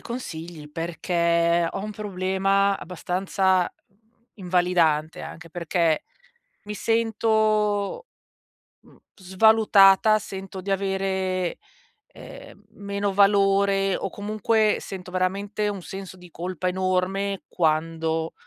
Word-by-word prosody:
consigli, 165 -10 -7
perché 170 +1 +1
ho 195 - -5
un 215 - -5
problema 195 0 0
abbastanza, 185 +1 0 0.3
mhmm, 195 - -35 0.4
invalidante, 175 -4 +1
anche 165 0 -10
perché 170 -1 0 0.6
mi 210 - -5
sento, 220 - +1 0.8
mhmm, - - -21 0.2
svalutata, 210 +1 +5
sento 190 -1 -8
di 195 +2 -4
avere, 190 -2 -1 0.5
ehm, - - -13
meno 200 -1 -3
valore 195 -1 +3
o - - -3
comunque 215 +2 0
sento 185 -2 -8
veramente 200 +3 -1
un 200 -2 -5
senso 190 +1 -8
di 180 -1 -14
colpa 180 +1 -4
enorme 185 +2 -1
quando 160 0 -1
190 Hz, 95 wpm, -24 LUFS, 180-200 Hz, 0.8 s, svalutata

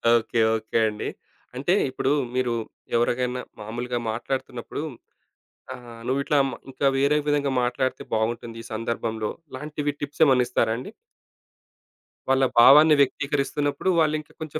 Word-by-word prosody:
Okay. 115 0 0 0.2
Okay 110 +1 -2
అండి. 105 - -4 0.5
అంటే 140 +8 +1 0.2
ఇప్పుడు 130 +1 -1 0.2
మీరు 125 -2 +1 0.4
ఎవరికైనా 125 +1 0 0.2
మామూలుగా 120 +3 -4
మాట్లాడుతున్నప్పుడు 120 +3 -4 0.9
ఆహ్, 120 -2 -11
నువ్విట్లా 140 +3 +1
మ - - -6 0.2
ఇంకా 140 +1 0
వేరే 140 +2 +3
విధంగా 145 -1 +1
మాట్లాడితే 125 +1 -1
బాగుంటుంది 115 +1 -2
ఈ - - -13
సందర్భంలో 110 -1 -2 0.2
ఇలాంటివి 145 +2 -3
టిప్స్ 145 0 -5
ఏమైనా 130 -3 +4
ఇస్తారా 110 -1 +1
అండి? 130 - -7 1.4
వాళ్ళ 135 0 +4
భావాన్ని 150 +5 +8
వ్యక్తీకరిస్తున్నప్పుడు 140 +3 0
వాళ్ళింకా 155 -1 0
కొంచెం 155 0 -4
130 Hz, 120 wpm, -24 LUFS, 120-145 Hz, 1.4 s, భావాన్ని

